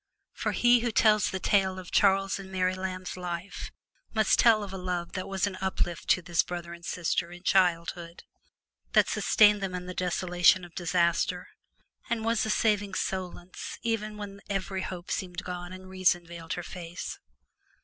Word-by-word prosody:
For - - -2
he 240 0 +5
who 240 +1 0
tells 215 -1 +4
the 190 - -3
tale 190 0 +2
of 185 -2 -9
Charles 195 0 +3
and 190 -1 -9
Mary 185 -1 +1
Lamb's 185 -1 -4
life 180 +1 -5 0.5
must 220 0 +3
tell 225 -3 +6
of 195 -1 -7
a - - -4
love 180 -1 -3
that 185 - -4
was 195 -1 0
an 195 -2 -4
uplift 185 -2 -2
to 180 - +4
this 170 -1 +2
brother 175 -1 -6
and 170 0 -12
sister 170 0 -1
in 175 +1 -11
childhood, 170 -2 +1 0.7
that - - +5
sustained 210 -1 +4
them 190 -2 -2
in 180 0 -5
the 180 - -6
desolation 180 0 +3
of 175 - -15
disaster, 170 -1 0 0.6
and 225 -1 -1
was 230 -1 +2
a - - -2
saving 205 -3 +1
solace 185 -1 -4
even 215 -2 -2
when 200 -1 -7
every 195 -1 -2
hope 180 -2 -6
seemed 180 -2 -3
gone 175 -1 -6
and 185 0 -10
reason 185 -2 +2
veiled 170 -1 -6
her 175 - -4
face. 175 -1 -7
185 Hz, 175 wpm, -28 LUFS, 175-195 Hz, 0.7 s, tell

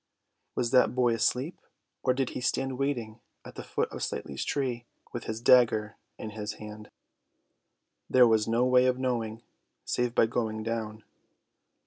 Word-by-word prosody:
Was 120 -1 0
that 125 - +4
boy 125 -2 +3
asleep, 125 +8 0 0.4
or 130 -1 +2
did 135 -1 -1
he - - -5
stand 130 0 -1
waiting 120 -5 -2 0.3
at - - -10
the - - -7
foot - - -1
of - - -7
Slightly's 70 - -3
tree, 125 -4 -2 0.3
with 120 - -5
his 110 0 -4
dagger 115 -3 +4 0.2
in 110 - -6
his 105 0 -5
hand? 105 0 -10 1.2
There 125 -1 +7
was 110 -2 +2
no 115 +2 +2
way 125 0 +5
of 125 0 +2
knowing, 115 -3 -2 0.4
save 125 -1 -1
by - - +5
going 110 -1 -2
down. 110 -1 -4
120 Hz, 155 wpm, -29 LUFS, 110-125 Hz, 1.2 s, There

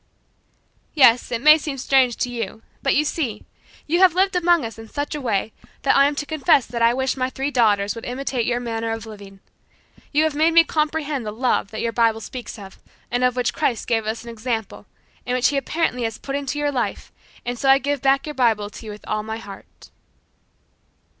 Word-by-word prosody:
"Yes, 250 -4 +5
it 235 0 -2
may 305 +1 +8
seem 290 -3 -5
strange 260 -2 +2
to 250 - -1
you, 225 -2 -5 0.2
but 275 - +1
you 300 - +2
see, 255 -10 -3 0.4
you 340 +3 +1
have 370 -3 +5
lived 380 +1 +2
among 345 -5 +3
us 225 0 -8
in 225 0 -11
such 290 +1 -4
a 300 - -4
way 220 -3 -1 0.3
that 275 - +3
I 275 0 +6
am 290 - -2
to 290 - -3
confess 305 -3 +2
that 235 0 -5
I 230 0 +5
wish 265 +1 0
that - - -11
my 255 0 0
three 270 +2 -3
daughters 205 -5 +2
would 230 - -9
imitate 250 -1 -2
your 240 0 0
manner 230 -1 -3
of 225 0 -6
living. 200 -3 -12 0.7
You 300 +1 +3
have 315 -1 +1
made 320 +3 +2
me 335 - +8
comprehend 305 -4 -1
the 210 - -4
love 235 -2 0
that 220 - -5
your 230 - -1
Bible 225 -1 +2
speaks 245 +3 -8
of, 195 -2 -12 0.3
and 245 +1 0
of 250 -1 +2
which 250 -1 0
Christ 235 -4 -1
gave 225 -2 0
us 220 +1 -3
an 235 - -8
example, 225 -1 -4 0.4
and 250 - -2
which 255 0 +3
He 285 - -1
apparently 275 -1 -1
has 225 -1 -2
put 275 - -5
into 285 0 -3
your 295 0 0
life, 250 -4 -3 0.3
and 245 0 -4
so 270 - +1
I 270 - +8
give 285 -1 -2
back 275 0 +2
your 300 - -5
Bible 225 -6 +1
to 225 - -11
you - - -5
with 210 - -11
all 215 0 -1
my 220 +1 -5
heart." 205 -3 -13
250 Hz, 225 wpm, -22 LUFS, 225-285 Hz, 0.7 s, may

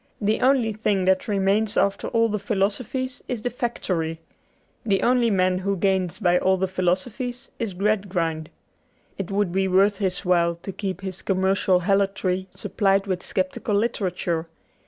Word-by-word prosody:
The 215 +2 0
only 255 -4 +3
thing 205 -3 0
that 190 0 +2
remains 205 +1 +1
after 200 0 +1
all 230 0 +2
the 210 -1 -2
philosophies 215 +6 -2
is 235 -4 -4
the 245 - -1
factory. 180 -10 -2 0.6
The 200 -4 +1
only 245 -1 +3
man 185 -2 +2
who 195 +1 -1
gains 185 -1 0
by 180 -4 +3
all 190 0 +2
the 190 +1 0
philosophies 215 +8 -2
is 220 -6 -3
Gradgrind. 180 -6 -1 0.7
It 195 - -3
would 200 -2 0
be 190 +1 +1
worth 195 +2 +3
his 190 -1 -2
while 170 -1 +3
to 170 +4 -7
keep 190 -1 -4
his 190 -1 -5
commercial 190 -1 +2
helotry 195 -1 0
supplied 195 -2 +1
with 185 -3 -2
sceptical 185 +3 -2
literature. 185 -6 -1
195 Hz, 155 wpm, -24 LUFS, 185-215 Hz, 0.7 s, only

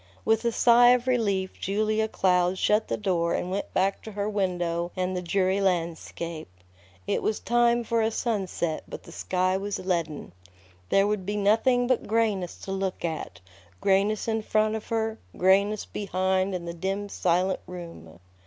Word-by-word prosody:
With 225 +1 +2
a 235 - +3
sigh 240 +1 +6
of 250 0 -3
relief 200 -7 0
Julia 215 +2 0
Cloud 180 -2 +2
shut 210 +3 +2
the - - -1
door 175 -5 0
and 180 - -3
went 200 +2 -3
back 195 +1 0
to 220 - -9
her 200 0 -2
window 175 -4 -1
and 185 0 -1
the 180 - -2
dreary 190 +2 +1
landscape. 170 -2 -2 0.6
It - - 0
was 215 - -1
time 240 0 +2
for 230 0 0
a 220 - +2
sunset, 195 -8 -2
but - - -8
the - - -13
sky 185 0 0
was 200 +1 -3
leaden. 170 -5 -2 0.6
There 195 0 +4
Would 210 -2 -1
be 205 +3 -3
nothing 225 +5 +3
but 255 -1 0
grayness 210 -5 0
to 195 - -6
look 190 -2 -2
at, 155 - -5 0.4
grayness 200 +3 +2
in 225 -1 0
front 215 0 +1
of 220 -1 -5
her, 225 -1 -1 0.2
grayness 200 +3 +3
behind 190 -1 -1
in 175 -1 -5
the 170 - -5
dim, 195 +4 -3
silent 185 0 +1
room. 165 - -10
195 Hz, 170 wpm, -26 LUFS, 180-215 Hz, 0.6 s, sigh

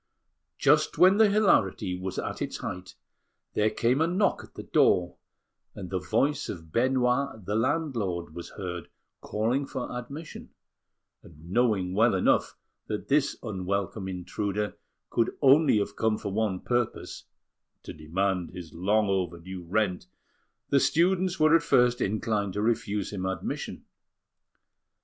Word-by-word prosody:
Just 150 +2 +3
when 185 +2 +6
the 220 -1 +6
hilarity 110 - +2
was 95 +1 -5
at - - -4
its - - -3
height, 90 0 -7 0.6
there 105 +1 +2
came 125 +6 +1
a 160 - +3
knock 190 +4 +1
at - - -17
the - - -7
door, 90 -1 +2 0.6
and 95 -3 -8
the 95 - 0
voice 135 +10 0
of 80 -4 -8
Benoit, 125 - +1
the 105 - -2
landlord, 115 - -1
was 85 0 -8
heard 90 -3 -6 0.3
calling 120 +6 -1
for 125 -1 -5
admission; 140 +6 -8 0.7
and, 85 +1 -14
knowing 100 -5 +1
well 110 +1 +4
enough 95 - +2 0.3
that 105 - -4
this 140 0 +2
unwelcome 100 -1 -3
intruder 100 +3 -3 0.4
could 115 - 0
only 140 -2 +5
have 100 - -2
come 110 -1 +1
for 100 - -5
one 105 -4 -1
purpose 120 -2 -2 0.6
to - - -8
demand 90 +3 -1
his 90 -3 -10
long 105 +5 +1
overdue 90 -1 -3
rent 90 0 -1 0.6
the 140 - +4
students 180 +4 +2
were 155 +1 +6
at 165 - +4
first 125 -6 +3
inclined 105 -1 -1
to 105 - -2
refuse 105 -3 -1
him 95 -2 -3
admission. 95 - -4
105 Hz, 140 wpm, -27 LUFS, 95-130 Hz, 0.7 s, when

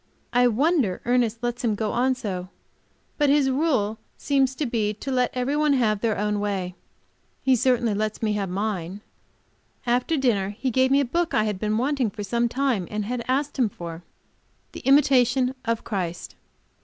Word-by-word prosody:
I 245 +1 +5
wonder 250 - +1
Ernest 240 -2 +1
lets 240 0 -2
him 220 -3 +1
go 215 0 -2
on 255 +2 +1
so. 190 -7 -5 0.7
But 295 -1 +3
his 280 -2 +3
rule 255 -7 0 0.2
seems 270 -2 +1
to 295 - -2
be 215 -4 -1
to 270 +6 -5
let 250 -1 +2
everybody 280 +3 +1
have 215 -4 +1
their 225 -3 0
own 210 0 0
way. 195 -3 -2 0.7
He 265 -1 +4
certainly 240 -2 +2
lets 215 +1 -2
me 215 -2 0
have 200 -2 -2
mine. 195 -1 -3 0.8
After 250 +6 +1
dinner 205 -7 +1
he 260 - 0
gave 260 +2 +3
me 275 +1 +4
a - - 0
book 340 +7 -1
I 215 - +3
have 210 -3 -2
been 215 +1 0
wanting 260 -1 +1
for 205 +1 -7
some 235 +3 0
time, 250 -8 0
and 210 -1 -3
had 240 +2 -3
asked 275 +2 -1
him 240 -4 +3
for 170 -3 -8 0.7
"The - - -8
Imitation 260 -2 +3
of 230 -1 -1
Christ." 180 -5 -4
235 Hz, 180 wpm, -24 LUFS, 210-265 Hz, 0.8 s, I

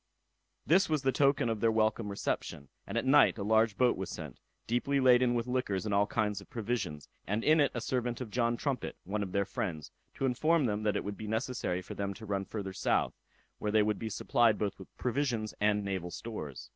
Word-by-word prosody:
This 190 +4 +4
was 155 -3 0
the 135 - +3
token 140 0 +3
of 115 -2 -1
their 115 +1 +3
welcome 110 -1 +1
reception, 75 -7 -3 0.2
and 100 - -3
at 115 - 0
night 140 -1 +5
a 100 - -3
large 110 0 +3
boat 125 -1 +4
was 95 -1 -5
sent, - - -7 0.3
deeply 130 +4 +1
laden 125 -1 +5
with 115 -1 0
liquors 125 -6 -1
and 105 - -1
all 100 +1 +3
kinds 105 -3 -1
of - - -16
provisions, 105 - -3 0.2
and 105 +3 -1
in 155 +1 +5
it 145 - +4
a 120 - -2
servant 120 -1 -1
of 125 -5 -6
John 120 0 +1
Trumpet, 140 -1 -3
one 105 +3 -2
of 95 -2 -3
their 100 +1 +1
friends, 90 -5 -4 0.2
to 135 - -1
inform 150 +4 +2
them 105 -2 -1
that 105 -1 +1
it - - -1
would 100 0 -5
be 110 - -6
necessary 110 -5 -2
for - - -8
them 100 -1 -3
to 110 - -10
run 100 -2 -2
farther 95 -3 -5
south, - - +1 0.5
where 105 - -1
they 110 0 +4
would 105 0 0
be 110 - -3
supplied 115 +2 +2
both 100 -2 -2
with 95 - -10
provisions 125 -4 -1
and 105 -1 +2
naval 95 -3 -3
stores. 85 - -7
110 Hz, 220 wpm, -31 LUFS, 100-125 Hz, 0.5 s, night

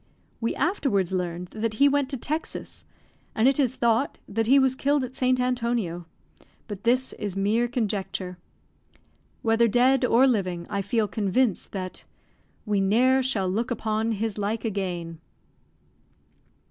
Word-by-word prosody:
We 230 - -1
afterwards 260 - 0
learned 180 -1 -3
that 220 0 -3
he 280 +5 +5
went 285 -1 +1
to 270 - -2
Texas, 310 +6 -5 0.5
and 220 +3 +3
it 275 +1 +3
is 260 -2 +2
thought 235 +3 +1
that 225 +2 -1
he 270 +3 +6
was 265 -1 +4
killed 280 +1 +1
at 255 +1 -6
St. 255 -1 +2
Antonio; 235 -9 -1 0.6
but 205 -1 -8
this 255 +2 +2
is 205 -3 -4
mere 215 +5 +2
conjecture. 200 -6 -3 1.0
Whether 225 +1 +3
dead 255 +4 +3
or 250 +1 +5
living, 185 -9 0
I 200 - 0
feel 225 +1 0
convinced 210 +2 0
that 185 -2 -6 0.6
"We 205 -2 +1
ne'er 250 +7 +3
shall 230 -8 0
look 220 +7 -1
upon 225 -1 -1
his 215 0 -3
like 210 +3 -2
again." 175 -6 -3
225 Hz, 145 wpm, -25 LUFS, 195-255 Hz, 1.0 s, he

